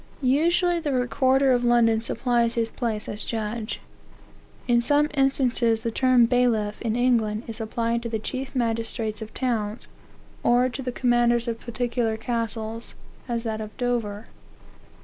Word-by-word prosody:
Usually, 340 +6 +3
the 300 -4 -2
recorder 260 +2 +2
of 245 -1 +2
London 235 -2 +4
supplies 235 0 0
his 230 -1 0
place 220 -3 -3
as 210 0 -6
judge. 220 0 -4 0.9
In 240 -1 +4
some 290 +4 +2
instances 250 -5 +2
the 230 - -1
term 255 0 +4
bailiff, 230 -4 +1
in 225 -1 -1
England, 230 -3 +1
is 225 0 -7
applied 230 +1 -1
to 235 - -4
the 225 - -1
chief 260 +5 -5
magistrates 225 -2 -1
of 220 0 -7
towns, 225 -4 -2 0.5
or 245 +1 +3
to 255 +2 -6
the 250 -1 -3
commanders 240 -1 +2
of 230 -1 -2
particular 235 -2 -2
castles, 225 -1 -3 0.3
as 235 -2 -2
that 220 -2 -3
of 215 0 -8
Dover. 230 -4 -2
235 Hz, 150 wpm, -25 LUFS, 225-250 Hz, 0.9 s, London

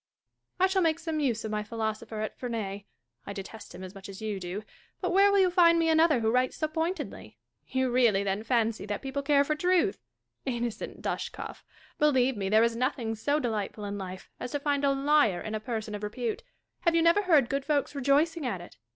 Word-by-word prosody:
Catharine. 375 - +6
I - - +4
shall 380 0 +1
make 325 -2 +2
some 320 -2 -3
use 240 -7 0
of 215 - -3
my 210 0 -1
philosopher 220 0 -4
at 215 - -4
Ferney. 210 -5 -4 0.4
I 200 - -4
detest 200 +3 -9
him 185 - -8
as 185 0 -8
much 195 -1 -10
as 195 - -8
you 215 -3 -3
do; 185 +3 -5 0.4
but 365 - -1
where 395 +2 +5
will 400 - +4
you 375 -2 +4
find 340 -2 +6
me 330 -1 +2
another 320 -5 +4
who 220 0 +2
writes 255 +1 +1
so 310 - 0
pointedly 325 +4 -4 0.2
% - - -48
You 260 -1 0
really, 235 -6 +4
then, 195 +1 -1
fancy 225 -2 0
that 205 +4 -3
people 270 +1 -2
care 280 0 +4
for 305 - 0
truth? 360 +5 +2 0.4
Innocent 240 -3 -4
Dashkof! - - -4 0.4
Believe 265 -4 +3
me, 195 -2 -2
there 215 +2 +5
is 230 0 +1
nothing 245 -2 -1
so 285 +7 0
delightful 215 -4 -3
in 200 0 -4
life 185 -1 -8
as 250 - -5
to 290 - 0
find 285 0 0
a 280 - +4
liar 275 -8 +3
in 215 - -5
a 215 - -1
person 220 -1 -4
of 205 - -5
repute. 230 - -3 0.4
Have 340 -2 +2
you 330 - +4
never 335 +5 +5
heard 315 -10 +4
good 275 +2 -1
folks 290 0 0
rejoicing 290 +4 +2
at 225 -8 -2
it 175 - -12
250 Hz, 220 wpm, -29 LUFS, 215-305 Hz, 0.4 s, Catharine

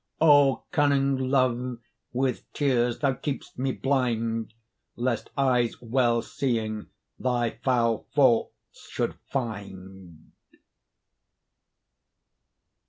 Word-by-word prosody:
O 145 -4 +5
cunning 140 -4 +2
Love! 125 -2 +1 0.3
with 130 -1 -2
tears 125 -4 +1
thou 140 -2 +1
keep'st 135 -1 -5
me 135 +1 0
blind, 115 -5 -1 0.4
Lest 120 -1 -2
eyes 125 -4 +2
well 120 -1 +1
seeing 110 -5 -2 0.3
thy 120 -3 -1
foul 115 -4 +1
faults 130 -5 +1
should - - -1 0.2
find. 95 - -6
125 Hz, 85 wpm, -26 LUFS, 115-135 Hz, 0.4 s, O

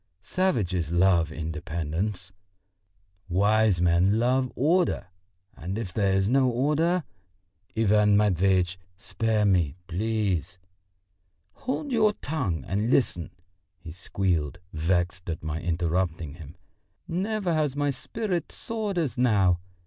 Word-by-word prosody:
"Savages 100 - 0
love 85 -2 +3
independence, 80 +4 -3 1.0
wise 100 +1 +3
men 90 +4 +3
love 125 +2 +1
order; 165 - +1 0.5
and 90 +5 -5
if 100 -6 -5
there 100 -2 +1
is 95 0 +2
no 130 +2 +3
order...." 150 +8 +1 0.7
"Ivan 105 -1 +4
Matveitch, 95 -2 +2 0.2
spare 110 -1 0
me, 85 -7 +2
please!" 95 -2 -1 1.0
"Hold 270 +2 -4
your 215 -3 +3
tongue 120 - -3
and 105 +5 -1
listen!" 115 -10 +1 0.5
he 85 -2 -10
squealed, 85 -3 -1 0.2
vexed 85 +2 -1
at 80 - -4
my 80 +1 -3
interrupting 85 -2 -1
him. 80 -2 -11 0.5
"Never 190 +1 -1
has 150 -4 0
my 145 0 +1
spirit 185 - -3
soared 215 -4 -4
as 140 -9 -1
now. 100 -8 +3
100 Hz, 110 wpm, -26 LUFS, 85-130 Hz, 1.0 s, Ivan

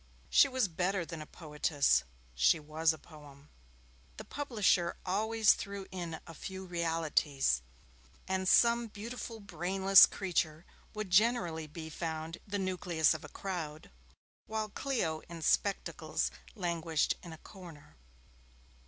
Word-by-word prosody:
She - - +7
was 260 -5 +1
better 180 +1 -1
than 165 -2 -7
a 155 - -9
poetess, 150 - +1 0.3
she 60 - +4
was 155 +2 +1
a 160 - -6
poem. 145 -2 -15 0.7
The - - -7
publisher 210 -11 +1
always 220 +3 +3
threw 200 -1 -6
in 170 -3 -5
a 165 - -10
few 190 +3 -7
realities, 160 - 0 0.7
and 190 0 0
some 235 0 +5
beautiful 225 +2 -7
brainless 190 0 +5
creature 170 -4 -2 0.3
would 210 -3 -4
generally 180 -6 +2
be 160 +1 -8
found 160 +1 -4
the 205 0 -2
nucleus 180 -5 +1
of 155 - -6
a - - -9
crowd, 160 -6 -6 0.6
while 220 -1 -2
Clio 205 - -1
in 170 -1 -7
spectacles 200 +5 0 0.2
languished 170 -5 0
in 170 - -10
a 160 - -9
corner. 170 -5 -13
175 Hz, 125 wpm, -32 LUFS, 160-200 Hz, 0.7 s, She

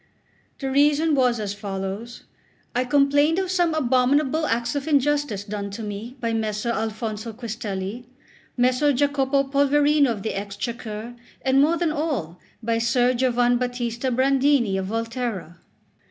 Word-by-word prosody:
The 270 -1 -3
reason 295 +3 +3
was 250 -4 +2
as 205 -2 -3
follows: 200 +3 -5 0.5
I 250 +1 +1
complained 285 +4 +3
of 375 -1 -1
some 350 -3 +2
abominable 280 +3 +2
acts 235 +1 0
of 285 +1 -3
injustice 290 -7 +1
done 205 -1 -5
to 200 +3 -7
me 215 +5 -6
by 230 -1 -1
Messer 220 +1 -1
Alfonso 220 0 -3
Quistelli, 220 -1 -5 0.5
Messer 255 +4 +3
Jacopo 275 0 +2
Polverino 285 +1 +3
of 210 -4 -3
the 220 - -2
Exchequer, 215 +3 -5 0.3
and 265 0 +4
more 320 +4 +3
than 335 -2 0
all 275 - -3 0.2
by 230 0 0
Ser 245 +2 +2
Giovanbattista 245 0 0
Brandini 260 -3 +2
of 190 - -3
Volterra. 225 -6 -4
245 Hz, 135 wpm, -23 LUFS, 220-280 Hz, 0.5 s, and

